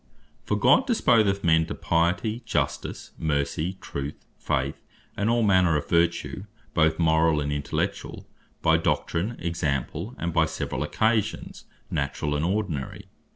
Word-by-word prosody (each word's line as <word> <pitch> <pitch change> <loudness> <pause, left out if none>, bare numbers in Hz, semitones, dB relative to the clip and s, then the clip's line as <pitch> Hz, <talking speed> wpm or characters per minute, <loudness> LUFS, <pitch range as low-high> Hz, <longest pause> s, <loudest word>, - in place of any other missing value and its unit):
For - - 0
God 265 - +4
disposeth 110 - +3
men 80 -1 +4
to - - -4
Piety, 90 +8 0
Justice, - - -2
Mercy, 75 +4 -1
Truth, 70 +1 -6
Faith, - - -2 0.3
and 105 +2 0
all 120 0 +2
manner 95 -6 +4
of 75 - -4
Vertue, 85 +3 +1 0.3
both 80 -1 +3
Morall, 80 -1 +3
and 75 0 -2
Intellectuall, 75 0 -3 0.4
by 80 0 +5
doctrine, 85 +6 -1
example, 85 - -2
and 85 -1 -3
by 80 -1 +4
severall 65 -4 -4
occasions, 110 +8 -1 0.3
naturall, 75 +1 -1
and 75 - -1
ordinary. 85 -7 -2
85 Hz, 130 wpm, -26 LUFS, 75-100 Hz, 0.4 s, by